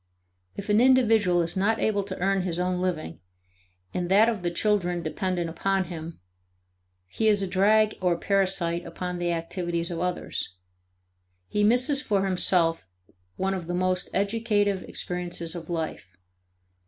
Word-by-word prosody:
If 200 +1 -7
an 210 +2 +4
individual 225 -9 +4
is 165 +3 -5
not 205 +4 +2
able 210 -2 +1
to 190 -1 -6
earn 195 +1 +1
his 175 -2 -2
own 180 0 -1
living 170 - -3 0.7
and 175 -1 -2
that 210 +4 +5
of 220 -5 -3
the 175 - 0
children 180 -2 0
dependent 175 +1 -2
upon 195 +4 0
him, 165 -2 -8 0.9
he 220 - -1
is 205 -2 +4
a - - -1
drag 210 +3 +3
or 180 -2 +2
parasite 185 -3 0
upon 180 +1 -5
the 175 0 0
activities 170 +1 -2
of 170 - -3
others. 180 - -3 0.9
He 210 - 0
misses 250 +6 +3
for 200 -7 0
himself 175 - +1 0.5
one 195 +1 -1
of 180 -3 -5
the 175 - -2
most 185 0 0
educative 205 -1 +1
experiences 175 -2 -4
of 170 -2 -8
life. 160 - -4
185 Hz, 150 wpm, -26 LUFS, 175-205 Hz, 0.9 s, that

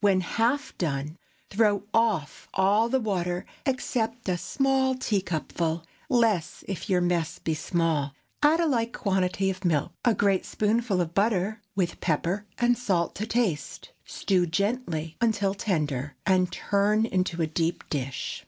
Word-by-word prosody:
When 195 -2 +4
half 235 +10 0
done, 150 0 -2 0.3
throw 205 -1 +3
off 215 -10 +1
all 205 +4 +3
the 265 +2 +2
water, 180 -5 -1 0.2
except 245 -3 -1
a 180 - +2
small 265 +6 +1
teacupful—less, 180 - -1
if 195 +2 -5
your 180 -2 +3
mess 175 -2 0
be 160 - -2
small; 155 -3 0 0.3
add 300 +3 +5
a 340 - +3
like 235 -6 0
quantity 190 -2 0
of 190 +1 -8
milk, 160 -5 +1
a 235 -3 +3
great 195 -1 +2
spoonful 215 -2 +1
of 170 -1 -3
butter, 210 +1 +1
with 185 -3 -1
pepper 180 +5 0
and 240 0 +3
salt 180 -8 0
to 215 +3 -3
taste. 205 - -1
Stew 180 -3 0
gently 170 -4 -1
until 205 -4 +2
tender, 150 - -1
and 185 -1 +3
turn 210 +2 +2
into 185 -5 -1
a 165 - +3
deep 165 +2 -2
dish. 135 -3 -3
190 Hz, 145 wpm, -27 LUFS, 170-225 Hz, 0.3 s, add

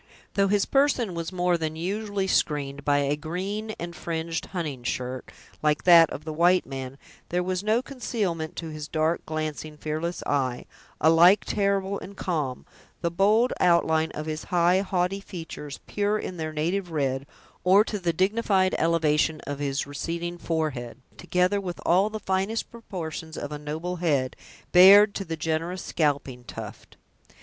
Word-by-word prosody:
Though 195 0 +3
his 200 0 +2
person 270 -7 +2
was 170 0 -4
more 180 -1 +1
than 160 -1 -2
usually 200 +3 -2
screened 140 -6 0
by 145 0 +3
a 140 +1 +1
green 195 +8 -4
and 170 0 -6
fringed 165 -1 -3
hunting 155 -8 -4
shirt, 125 +1 -4 0.3
like 150 -1 +1
that 170 -3 +8
of 150 - -7
the 155 - -4
white 175 +3 +4
man, 135 0 -6 0.3
there 180 +1 0
was 185 0 -1
no 220 +4 +2
concealment 200 - -3
to 165 -1 -5
his 155 -1 -6
dark, 160 +2 0
glancing, 155 -1 -4
fearless 155 +3 -3
eye, 130 -3 -1 0.3
alike 165 +5 +6
terrible 200 -1 0
and 200 +1 -10
calm; 150 -8 -2 0.4
the 170 - 0
bold 210 +7 +3
outline 160 -2 +3
of 155 - -4
his 155 0 -4
high, 175 +1 +3
haughty 190 0 0
features, 165 -7 -8
pure 205 +1 0
in 185 -3 -5
their 160 -1 -3
native 175 +5 -1
red; 140 -3 -1 0.4
or 190 +3 +6
to 210 -2 -4
the 175 -2 0
dignified 190 +1 +2
elevation 160 -1 +2
of 145 -1 -5
his 140 -1 -1
receding 170 +4 -4
forehead, 145 -10 -2 0.2
together 180 +3 +1
with 175 -5 -5
all 190 +5 +4
the 215 0 -5
finest 195 +3 -1
proportions 165 -8 -7
of 145 - -5
a 150 - -5
noble 160 +5 -4
head, 145 -7 0 0.4
bared 200 +3 +8
to 195 - -3
the 165 -3 -5
generous 165 +3 -2
scalping 140 -5 -1
tuft. - - -9
170 Hz, 160 wpm, -26 LUFS, 155-190 Hz, 0.4 s, that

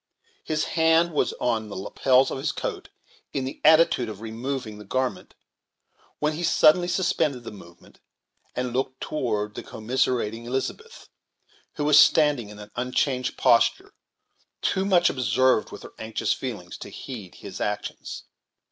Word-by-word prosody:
His 155 -1 -1
hand 165 +1 +3
was 150 - +1
on 110 -3 -1
the - - -7
lapels 130 +7 +2
of - - -3
his 145 +3 -1
coat, - - -5 0.4
in 135 -2 -1
the 135 - -7
attitude 155 -6 +5
of 105 -2 -8
removing 115 0 -5
the - - -9
garment, 130 +5 -3 0.8
when 150 +1 0
he 155 - -5
suddenly 175 +1 +4
suspended 160 -8 0
the 115 - -7
movement, 85 -4 -15 0.6
and 125 -1 -2
looked 130 +1 -2
toward 105 -7 -2
the - - -6
commiserating 115 -1 -1
Elizabeth, 135 - -4 0.7
who 145 - -2
was 150 0 +7
standing 145 -11 +4
in 105 - -11
an 105 0 -11
unchanged 125 +1 -1
posture, 115 - +3 0.7
too 190 - +1
much 180 -3 +4
absorbed 130 0 +2
with - - -9
her - - -11
anxious 110 0 -1
feelings - - -6
to - - -8
heed 110 -9 -9
his - - -9
actions. 105 0 -4
130 Hz, 145 wpm, -25 LUFS, 110-150 Hz, 0.8 s, was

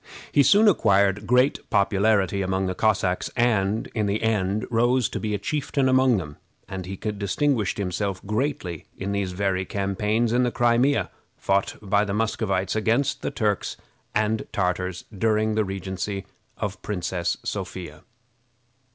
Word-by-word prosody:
He 145 - +5
soon 205 +9 +6
acquired 100 - +3
great 125 +3 +2
popularity 100 -1 +2
among 95 0 0
the 95 - -1
Cossacks, 95 -3 +1
and, 110 -3 +1
in 110 -3 0
the 105 +2 -1
end, 105 -2 0
rose 120 +1 +3
to - - -4
be 105 -1 -1
a - - 0
chieftain 140 +4 -1
among 130 -2 +4
them, 75 -5 -6 0.3
and 95 -2 -6
he 95 - -5
distinguished 105 +4 -1
himself 95 0 -2
greatly 105 - -2
in 95 +1 -3
these 100 -2 -1
very 95 -1 0
campaigns 105 +4 0
in 125 - +3
the 125 - +2
Crimea, 120 +4 +2 0.3
fought 100 0 0
by 100 +1 +2
the 100 -1 -2
Muscovites 100 -4 0
against 115 +6 +1
the - - -1
Turks 105 -3 -1 0.4
and 110 +1 0
Tartars 90 -1 -1
during 110 +1 +1
the 110 0 +2
regency 95 0 -4 0.3
of 105 - -2
the 100 - -16
Princess 90 -3 -2
Sophia. 90 -5 -5
105 Hz, 150 wpm, -24 LUFS, 95-115 Hz, 0.4 s, soon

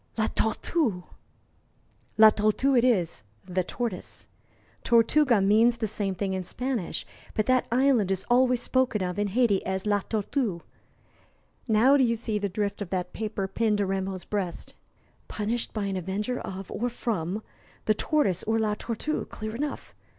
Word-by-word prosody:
"La 220 - +2
Tortue!" 220 - 0 1.1
"La 220 0 +9
Tortue 215 +6 +2
it 240 - +4
is 190 - +1 0.2
the 185 0 -1
tortoise. 230 -1 -5 0.6
Tortuga 235 +1 +4
means 220 +4 +4
the 225 - -1
same 205 -2 -2
thing 190 +1 -2
in 190 -1 -2
Spanish. 245 0 -3 0.3
But 215 - +1
that 255 +1 +2
island 250 -5 +3
is 190 -1 -1
always 250 0 +3
spoken 255 -6 +1
of 180 +2 -3
in 205 - +1
Hayti 210 -1 +2
as 190 +1 -3
La 205 -1 +2
Tortue. 210 - -2 1.1
Now, 240 +5 +5
do 270 - +4
you 235 -1 +2
see 220 -2 -2
the 200 0 -2
drift 205 +2 -2
of 200 - -4
that 180 -2 -3
paper 210 -3 -3
pinned 210 +2 +1
to 205 - +1
Rameau's 190 -1 -3
breast?" 195 -5 -4 0.5
"Punished 225 +3 -2
by 215 -2 -2
an 195 -1 -2
avenger 205 +7 -2
of 190 0 -7
or 245 +2 -1
from 215 -4 -3 0.4
the 215 - +4
tortoise 215 - +1
or 225 +1 +1
La 215 -1 +1
Tortue 235 +8 -3
clear 215 +1 -6
enough. 290 +3 -4
215 Hz, 160 wpm, -27 LUFS, 195-240 Hz, 1.1 s, La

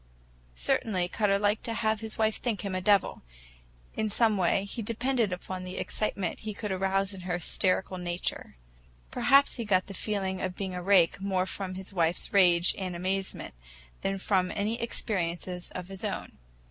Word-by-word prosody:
Certainly 180 - 0
Cutter 200 -1 +2
liked 205 +1 +1
to 230 - -2
have 220 -1 +1
his 220 0 -4
wife 220 -1 +2
think 230 -5 -2
him 200 -2 -4
a 185 - -1
devil. 200 0 +3 0.7
In 220 0 0
some 220 +1 +3
way 190 +1 +2
he 215 +3 -4
depended 230 0 0
upon 185 +1 -5
the 185 +1 -6
excitement 200 -4 -2
he 215 -1 -5
could 210 -1 -4
arouse 195 +1 +1
in 190 - -8
her 175 -1 -2
hysterical 185 +1 0
nature. 175 0 -3 0.6
Perhaps 275 0 +4
he 235 - -2
got 185 -4 +2
the 200 - -8
feeling 190 -2 -2
of 185 -1 -2
being 190 -1 -4
a 180 - -4
rake 190 -1 +4
more 190 -2 +1
from 190 -1 -5
his 190 +1 -6
wife's 170 -1 0
rage 175 -3 +6
and 185 -2 -3
amazement 190 +2 -3 0.5
than 195 0 -1
from 190 -1 +1
any 215 +3 -1
experiences 180 -5 -2
of 180 0 -6
his 195 -1 -9
own. - - -4
195 Hz, 175 wpm, -29 LUFS, 185-210 Hz, 0.7 s, rage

